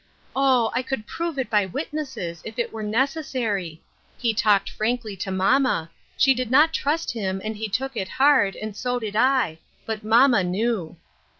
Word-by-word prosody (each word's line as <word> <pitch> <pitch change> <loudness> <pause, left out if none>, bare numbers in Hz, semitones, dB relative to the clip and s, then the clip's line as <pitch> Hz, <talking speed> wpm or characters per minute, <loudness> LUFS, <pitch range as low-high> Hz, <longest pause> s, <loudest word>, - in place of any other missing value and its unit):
Oh! 260 -4 +3
I - - +1
could 255 -4 -4
prove 335 +4 -4
it 265 - -1
by 205 -3 +2
witnesses 265 - -5
if 220 - -8
it 235 - -2
were 220 - -5
necessary. 220 - -2 0.3
He 235 -2 0
talked 205 -2 +3
frankly 220 -1 -2
to 190 - -4
mamma; 190 -2 +1 0.3
she 270 - +5
did 250 -2 -3
not 300 +5 +5
trust 320 +3 0
him, 195 -4 -3
and 215 0 -3
he 215 +1 -4
took 265 +5 -2
it 190 - -2
hard, 265 -8 +3
and 215 -1 -6
so 245 +3 -1
did 215 -3 -5
I; 250 -9 +2 0.3
but 220 -1 -4
mamma 230 -1 +5
knew." 185 -2 -1
225 Hz, 175 wpm, -24 LUFS, 205-265 Hz, 0.3 s, she